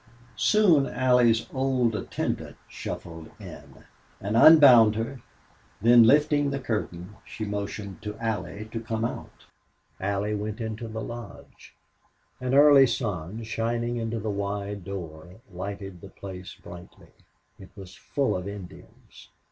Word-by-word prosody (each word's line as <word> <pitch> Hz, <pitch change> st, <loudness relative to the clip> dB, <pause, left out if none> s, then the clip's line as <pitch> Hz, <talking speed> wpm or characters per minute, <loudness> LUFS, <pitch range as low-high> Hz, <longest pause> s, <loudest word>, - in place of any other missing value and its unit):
Soon 175 Hz, -, +4 dB
Allie's 125 Hz, -3 st, +3 dB
old 130 Hz, -4 st, +1 dB
attendant -, -, -4 dB
shuffled 80 Hz, -2 st, -8 dB
in, -, -, -12 dB, 0.3 s
and 100 Hz, +3 st, -3 dB
unbound 125 Hz, -6 st, +8 dB
her, 115 Hz, +3 st, -4 dB, 0.6 s
then, 120 Hz, +3 st, +6 dB
lifting 145 Hz, +2 st, +3 dB
the 140 Hz, -, -2 dB
curtain 105 Hz, -5 st, -4 dB
she 110 Hz, -, -7 dB
motioned 100 Hz, -1 st, -5 dB
to 105 Hz, -1 st, -6 dB
Allie 110 Hz, -2 st, -4 dB
to 115 Hz, -, -4 dB
come 115 Hz, 0 st, -3 dB
out. -, -, -7 dB, 0.5 s
Allie 100 Hz, +2 st, -1 dB
went 105 Hz, 0 st, -4 dB
into 110 Hz, 0 st, -5 dB
the 110 Hz, 0 st, -6 dB
lodge. 120 Hz, -2 st, -10 dB, 0.6 s
An 130 Hz, +1 st, -1 dB
early 140 Hz, -2 st, +7 dB
sun 105 Hz, -, -4 dB
lighted 120 Hz, 0 st, -1 dB
the 100 Hz, -2 st, -6 dB
place 95 Hz, -2 st, -9 dB
brightly. 85 Hz, 0 st, -13 dB, 0.5 s
It 95 Hz, -, -13 dB
was 95 Hz, -2 st, -11 dB
full 140 Hz, +6 st, -2 dB
of 90 Hz, +1 st, -4 dB
Indians. 100 Hz, -3 st, -12 dB
110 Hz, 115 wpm, -26 LUFS, 100-120 Hz, 0.6 s, unbound